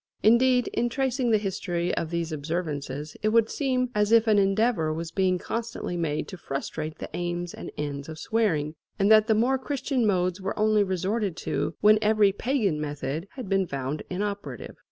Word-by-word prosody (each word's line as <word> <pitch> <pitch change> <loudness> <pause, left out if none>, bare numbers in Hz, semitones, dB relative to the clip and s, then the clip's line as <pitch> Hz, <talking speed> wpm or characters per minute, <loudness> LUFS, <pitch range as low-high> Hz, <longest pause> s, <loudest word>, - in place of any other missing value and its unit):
Indeed, 245 +3 +5
in 240 - 0
tracing 260 -1 0
the 220 - +5
history 185 -4 -2
of 165 - -2
these 170 -1 -2
observances 150 -2 -4
it 215 - +2
would 225 0 +3
seem 255 -3 0
as 210 -1 +1
if 230 -1 +6
an 215 -2 +4
endeavour 195 -4 +2
was 165 +1 -4
being 185 -1 +2
constantly 230 -2 -4
made 160 -3 -1
to 190 - -7
frustrate 155 +1 -5
the - - -7
aims 175 0 -3
and - - -7
ends 145 0 -4
of 155 - -7
swearing, 160 -8 0 0.2
and 200 +2 +3
that 215 0 +7
the 220 - +4
more 255 +5 +2
Christian 265 -3 -1
modes 185 -1 +1
were 195 +2 -3
only 215 0 +3
resorted 190 0 -1
to - - -1
when 215 +1 +6
every 210 -2 +4
pagan 205 - 0
method 150 +3 -4
had 255 -6 -7
been 195 -1 +1
found 140 +1 -3
inoperative. 200 +2 -4
195 Hz, 180 wpm, -26 LUFS, 165-225 Hz, 0.2 s, that